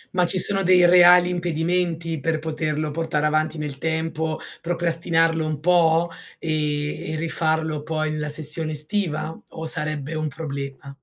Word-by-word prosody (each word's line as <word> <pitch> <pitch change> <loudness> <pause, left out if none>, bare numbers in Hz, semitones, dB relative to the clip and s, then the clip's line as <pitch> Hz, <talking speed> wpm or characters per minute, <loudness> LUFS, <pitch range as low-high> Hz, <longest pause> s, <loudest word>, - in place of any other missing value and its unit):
Ma 180 -1 +2
ci 185 - +2
sono 195 +2 +4
dei 180 -1 +4
reali 175 0 +6
impedimenti 170 -1 -2
per 160 +3 -1
poterlo 155 -1 -3
portare 150 -1 -2
avanti 155 +1 0
nel 145 -2 -6
tempo, 160 0 -2 0.2
procrastinarlo 165 -1 +1
un 155 -2 -3
po' 170 0 +2 0.3
e 155 -1 -2 0.5
e - - -2
rifarlo 160 -1 +1
poi 155 0 -3
nella 150 -1 -4
sessione 155 +1 +2
estiva 160 0 -1
o 160 - -8
sarebbe 150 -1 0
un 155 0 -2
problema? 140 -2 -7
160 Hz, 140 wpm, -22 LUFS, 155-170 Hz, 0.5 s, reali